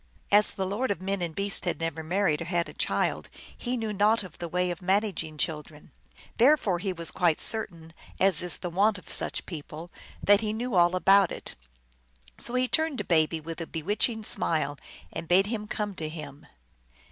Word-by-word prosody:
As 205 +1 +7
the 190 - -2
Lord 205 +7 -2
of 200 - -1
Men 195 0 -2
and 170 -2 -3
Beasts 200 -1 +1
had 175 -2 -2
never 165 -1 -3
married 170 -1 0
or - - -3
had 170 -1 0
a - - -10
child, - - -1 0.3
he 250 0 -3
knew 220 -2 -3
naught 210 +2 +3
of 180 -4 -12
the 170 - -4
way 180 +1 0
of 175 - -5
manag 195 0 +1
ing 155 -1 -10
children. 150 -1 -4 0.5
Therefore 235 - +4
he 195 +1 -2
was 170 -2 -2
quite 170 -4 +1
certain, 170 -7 -1 0.3
as 190 -4 +4
is 180 0 0
the 175 - -5
wont 205 +4 +2
of 185 - -10
such - - -1
people, 160 0 -8 0.3
that 205 +1 +5
he 215 -1 -2
knew 240 +2 -3
all 175 0 +4
about 195 0 +5
it. - - -6 0.9
So 240 - -2
he 255 0 +2
turned 315 0 +1
to - - -2
Baby 160 -1 +2
with 165 +1 -7
a 165 - -5
bewitching 210 +7 0
smile 155 -7 0 0.4
and 165 0 -5
bade 185 +3 +4
him 210 0 -4
come 210 -1 -3
to 155 -1 -4
him. 150 -3 -9
185 Hz, 200 wpm, -27 LUFS, 165-210 Hz, 0.9 s, As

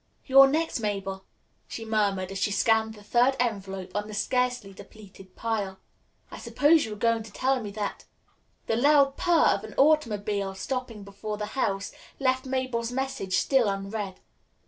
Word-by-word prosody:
"You're 270 0 +8
next, 315 0 0
Mabel," 195 -3 -3 0.4
she 225 - -7
murmured 200 -4 0
as 195 - -4
she 200 - +1
scanned 220 +2 +2
the 210 - -14
third 245 +5 +3
envelope 195 -5 -3
on 205 0 -2
the 215 - -7
scarcely 250 -2 -1
depleted 195 -2 -14
pile. 205 -4 -2 0.5
"I - - -8
suppose 305 +2 +3
you 220 - -6
are - - -7
going 230 +2 +1
to 215 -1 -11
tell 260 +4 0
me 210 - -5
that 205 -1 -4 0.3
" - - -42
The 225 - 0
loud 280 +1 +4
purr 340 -2 +3
of - - 0
an - - -9
automobile 210 -10 +2
stopping 235 +1 -4
before 200 +2 -6
the 210 - -3
house 200 -7 -1 0.3
left 260 -1 0
Mabel's 255 -3 -2
message 265 -7 -2
still 260 -6 +3
unread. 195 0 -4
220 Hz, 170 wpm, -27 LUFS, 200-260 Hz, 0.5 s, You're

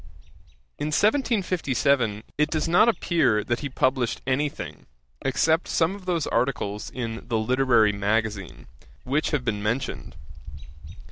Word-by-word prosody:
In 145 - -2
1757 155 - +1
it 150 0 +1
does 155 0 -1
not 180 +7 +5
appear 165 - +2
that 120 +3 -1
he 145 - -4
published 130 -2 0
any 135 +3 +1
thing, - - -9 0.3
except 160 +5 +1
some 165 +2 +1
of 200 -2 -10
those 170 -4 0
articles 115 -5 -1
in 115 -2 -5
The 115 -2 0
Literary 120 -1 +3
Magazine, 105 -1 -2 0.4
which 140 +5 0
have 140 -4 -1
been 105 -3 -1
mentioned. 120 +6 -3
130 Hz, 130 wpm, -25 LUFS, 115-160 Hz, 0.4 s, not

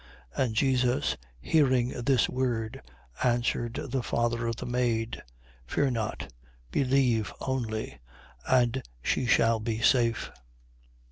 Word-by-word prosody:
8:50. - - +2
And 115 -4 -2
Jesus 125 0 +2 0.2
hearing 130 - +3
this 125 0 +2
word, 120 -4 -2 0.4
answered 120 -1 +1
the 130 +1 0
father 120 0 0
of 115 - -1
the - - -6
maid: 120 -2 -1 0.5
Fear 140 - +1
not. 110 - -3 0.4
Believe 125 -6 +2
only: 115 -5 -3 0.5
and 125 0 +3 0.2
she 125 - 0
shall 115 -1 +4
be 110 0 -2
safe. 115 -1 +2
120 Hz, 115 wpm, -28 LUFS, 115-130 Hz, 0.5 s, shall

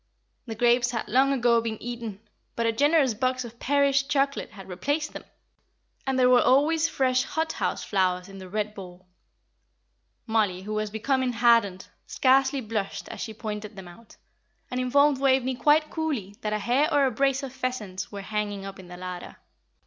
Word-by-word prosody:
The 225 - -5
grapes 240 +1 +3
had 230 -2 -3
long 265 +4 +3
ago 240 -3 +3
been 225 -1 -3
eaten, 230 -4 -6 0.3
but 230 - -1
a 230 - +3
generous 285 +1 +3
box 255 +3 -1
of 235 0 -12
Paris 280 0 +3
chocolate 280 0 -1
had 195 -3 -12
replaced 285 - -2
them, - - -8 0.8
and 265 -1 +1
there 255 -1 +5
were 250 -1 +6
always 315 +5 +3
fresh 255 -4 +2
hot 320 +4 -2
house - - -2
flowers 185 -2 0
in 195 0 -11
the 185 -1 -10
red 210 +1 -2
bowl. 185 -2 -11 1.2
Mollie, 210 -5 0
who 210 +2 -5
was 215 0 -1
becoming 255 +4 0
hardened, 230 -6 +3 0.2
scarcely 270 +1 +3
blushed 215 -3 -4
as - - -7
she 220 -2 -5
pointed 210 -2 -6
them 190 -2 -9
out, 195 +6 -16 0.5
and 250 - -2
informed 280 +2 +3
Waveney 260 -1 +3
quite 300 +4 +3
coolly 275 - -3
that 210 - -2
a 215 - +1
hare 250 +8 +1
or 285 -1 +4
a 260 - +1
brace 270 +3 +1
of 265 -2 -6
pheasants 215 -8 -4
were 200 -1 -6
hanging 205 -1 -3
up 195 0 -8
in 185 - -11
the 180 0 -10
larder. 180 -1 -7
235 Hz, 180 wpm, -26 LUFS, 205-270 Hz, 1.2 s, were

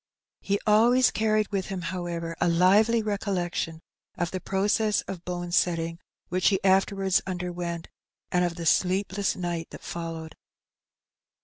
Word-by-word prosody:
He 200 0 0
always 235 +4 +5
carried 215 -1 +1
with 195 -2 -1
him, 190 -2 -4
however, 170 -1 -4
a - - +3
lively 205 +7 +4
recollection 180 -6 -2 0.4
of 175 0 -1
the 185 - -3
process 205 +3 +1
of 180 -3 -8
bone 175 -1 -4
setting, 165 -1 +1 0.3
which 185 +1 +1
he 195 -2 +3
afterwards 195 0 +3
underwent, 175 -2 -4 0.4
and 180 0 +2
of 175 -1 -1
the 170 -1 -6
sleepless 190 +3 +1
nig^ 175 -2 -3
that - - -11
followed. 165 -1 -6
185 Hz, 135 wpm, -27 LUFS, 170-200 Hz, 0.4 s, always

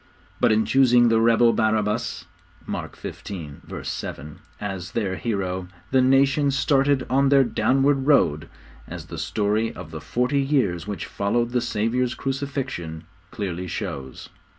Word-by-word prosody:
But 120 -2 +4
in 110 0 +3
choosing 125 -3 +5
the 115 0 +3
rebel, 115 0 +5
Barabbas 110 -1 0 0.4
(Mark - - -5
xv. 80 -8 -8
7) 75 +2 -6 0.2
as 95 -4 -5
their 100 -5 -1
hero, 95 -5 -2 0.2
the 130 -1 +4
nation 135 +2 +3
started 140 -1 +2
on 135 +1 +3
their 140 -1 +6
downward 135 +4 +1
road, 75 - +3 0.4
as - - -7
the - - -4
story 105 +2 0
of 85 -4 -10
the 80 -1 -7
forty 125 - 0
years 125 - 0
which 100 -5 -4
followed 120 +4 -1
the 125 0 +1
Saviour's 120 +2 0
crucifixion 130 - -4 0.3
clearly 90 -3 -4
shows. 65 -5 -6
115 Hz, 135 wpm, -24 LUFS, 95-135 Hz, 0.4 s, their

